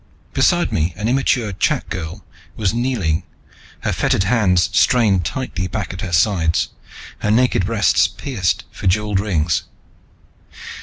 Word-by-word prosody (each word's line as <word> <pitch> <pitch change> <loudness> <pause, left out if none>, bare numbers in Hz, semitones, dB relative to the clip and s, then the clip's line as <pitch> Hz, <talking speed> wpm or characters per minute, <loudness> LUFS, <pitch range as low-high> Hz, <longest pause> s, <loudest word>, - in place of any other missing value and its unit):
Beside - - +2
me 80 +2 0
an 105 - -2
immature 125 -3 +1
chak - - 0
girl 90 +2 -6 0.3
was 105 -2 0
kneeling, 115 -10 0 0.6
her - - -1
fettered 95 - +1
hands 90 -5 +2
strained 100 -2 +3
tightly 95 -2 -3
back 100 +2 -4
at 95 - -7
her 95 -4 -4
sides, 85 -1 +2 0.5
her 105 - -1
naked 110 -4 +2
breasts 110 -4 +3
pierced 110 -11 -2
for - - -4
jeweled 105 +1 +1
rings. 85 -7 0
95 Hz, 135 wpm, -19 LUFS, 90-110 Hz, 0.6 s, strained